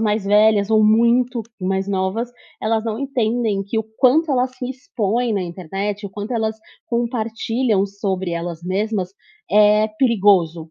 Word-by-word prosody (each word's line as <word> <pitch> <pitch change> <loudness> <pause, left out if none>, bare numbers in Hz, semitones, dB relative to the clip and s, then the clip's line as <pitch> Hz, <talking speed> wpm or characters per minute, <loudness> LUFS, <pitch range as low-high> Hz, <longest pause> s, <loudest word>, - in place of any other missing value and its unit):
mais 210 -2 0
velhas 210 0 +4
ou 215 -1 +4
muito 235 +2 +3 0.2
mais 190 +1 -1
novas, 200 +5 -1 0.3
elas 220 0 0
não 220 0 -3
entendem 235 -6 -1
que 220 +3 -2
o 220 - -2
quanto 295 +5 +4
elas 255 0 +1
se 250 0 -5
expõem 240 -2 -2
na 195 -3 0
internet, 195 +4 -4
o - - -10
quanto 210 +4 -6
elas 220 -1 -1 0.3
compartilham 230 -2 -1
sobre 190 -2 -3
elas 170 0 -4
mesmas, 190 0 -2 0.4
é 210 +1 +5
perigoso. 190 - +2
215 Hz, 145 wpm, -20 LUFS, 195-235 Hz, 0.4 s, é